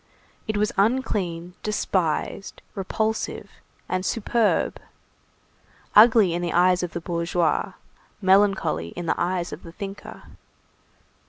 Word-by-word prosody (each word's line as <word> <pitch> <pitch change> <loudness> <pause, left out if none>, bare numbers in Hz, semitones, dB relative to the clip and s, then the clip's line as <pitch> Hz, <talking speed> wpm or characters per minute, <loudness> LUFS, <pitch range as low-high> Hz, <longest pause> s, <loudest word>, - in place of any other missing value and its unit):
It 215 -1 -1
was 210 +2 +1
unclean, 195 -6 0
despised, 195 -3 -2
repulsive, 220 +3 -2 0.4
and 185 0 -1
superb, 225 +1 0 1.2
ugly 215 -4 +7
in 175 - -2
the 175 -1 -2
eyes 180 +1 +4
of 180 -1 -4
the - - -3
bourgeois, 170 +2 0 0.5
melancholy 195 - +2
in 175 - -5
the - - -1
eyes 175 0 -1
of - - -8
the 165 - -11
thinker. 200 +1 -8
185 Hz, 110 wpm, -24 LUFS, 175-210 Hz, 1.2 s, ugly